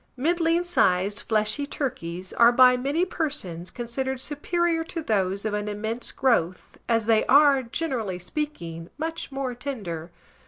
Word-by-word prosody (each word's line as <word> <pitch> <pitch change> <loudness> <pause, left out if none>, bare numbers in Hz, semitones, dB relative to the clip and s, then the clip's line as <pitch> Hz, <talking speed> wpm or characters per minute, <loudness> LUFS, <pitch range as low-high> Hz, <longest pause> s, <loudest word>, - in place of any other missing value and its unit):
Middling 335 +4 +2
sized 200 - +2
fleshy 215 +6 +1
turkeys 185 - -4
are 235 0 +6
by 250 +1 +6
many 280 +8 0
persons 185 - -3
considered 260 +2 -4
superior 330 +4 0
to 330 -1 -5
those 200 -4 0
of 215 - -1
an 210 0 -2
immense 220 +3 -3
growth, 185 -9 0
as 230 -2 +2
they 225 -1 +4
are, 280 0 +6
generally 235 - -3
speaking, 175 - -5
much 325 +1 -4
more 270 -2 -3
tender. 200 - -5
245 Hz, 135 wpm, -25 LUFS, 205-295 Hz, -, are